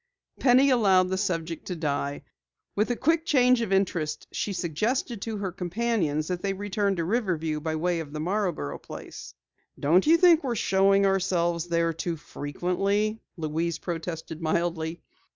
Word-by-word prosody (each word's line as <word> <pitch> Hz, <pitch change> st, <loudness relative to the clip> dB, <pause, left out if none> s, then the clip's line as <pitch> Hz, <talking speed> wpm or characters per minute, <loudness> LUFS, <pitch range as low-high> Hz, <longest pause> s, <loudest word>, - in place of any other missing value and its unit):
Penny 265 Hz, +2 st, +5 dB
allowed 190 Hz, -7 st, +4 dB
the 190 Hz, -, -1 dB
subject 170 Hz, -4 st, -2 dB
to 180 Hz, -, -3 dB
die. 145 Hz, -3 st, -2 dB, 0.5 s
With 210 Hz, +3 st, +1 dB
a 245 Hz, -, +1 dB
quick 320 Hz, +6 st, +2 dB
change 255 Hz, -6 st, +4 dB
of 220 Hz, -4 st, -2 dB
interest, 175 Hz, -6 st, 0 dB
she 205 Hz, -, -2 dB
suggested 205 Hz, -, -1 dB
to 220 Hz, 0 st, -3 dB
her 195 Hz, -2 st, -3 dB
companions 175 Hz, -4 st, -1 dB
that 180 Hz, -1 st, -2 dB
they 195 Hz, -1 st, -1 dB
return 200 Hz, 0 st, -1 dB
to 170 Hz, -, -1 dB
Riverview 165 Hz, -6 st, -1 dB
by 160 Hz, +1 st, -2 dB
way 170 Hz, +2 st, 0 dB
of 155 Hz, -3 st, -6 dB
the 155 Hz, -, -5 dB
Marborough 180 Hz, -, -2 dB
place. -, -, -10 dB, 0.4 s
"Don't 175 Hz, -, +3 dB
you 330 Hz, +2 st, +7 dB
think 335 Hz, -2 st, +5 dB
we're 250 Hz, -3 st, -1 dB
showing 195 Hz, -1 st, +3 dB
ourselves 175 Hz, -3 st, +1 dB
there 170 Hz, -1 st, +1 dB
too 165 Hz, +1 st, -3 dB
frequently," 195 Hz, +9 st, -1 dB, 0.2 s
Louise 160 Hz, +1 st, -2 dB
protested 165 Hz, -1 st, -5 dB
mildly. 165 Hz, 0 st, -1 dB
180 Hz, 155 wpm, -26 LUFS, 165-210 Hz, 0.5 s, you